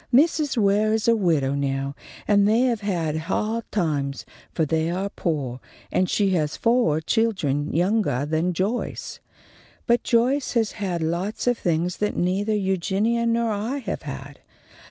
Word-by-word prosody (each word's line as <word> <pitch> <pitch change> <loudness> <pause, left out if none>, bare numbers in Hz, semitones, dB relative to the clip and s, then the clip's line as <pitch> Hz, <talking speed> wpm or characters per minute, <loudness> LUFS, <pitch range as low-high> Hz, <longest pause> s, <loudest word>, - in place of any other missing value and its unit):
Mrs. 295 +1 +3
Ware 210 +1 +3
is 220 0 -1
a 230 - +5
widow 160 -10 +1
now, 140 0 -1 0.3
and 200 -1 +4
they 220 +3 +3
have 240 -4 +1
ha'd 185 +4 -1
times, 145 -8 -1 0.3
for 160 - 0
they 160 +2 0
are 190 +3 -2
poah, 135 -7 -2 0.3
and 185 - +1
she 200 -2 +2
has 155 -5 0
foah 230 -11 +2
children 160 - 0
youngah 175 - +1
than 160 +4 0
Joyce. 200 +8 -3 0.7
But 235 0 +3
Joyce 250 +4 +1
has 225 -3 +1
had 185 -6 -3
lots 175 +6 -2
of 245 0 +3
things 175 +1 0
that 210 - -1
neithah 200 +4 +1
Eugenia 200 +5 0
nor 230 0 +1
I 215 +7 -2
have 220 -8 -4
had. 140 -1 -8
195 Hz, 150 wpm, -24 LUFS, 160-225 Hz, 0.7 s, a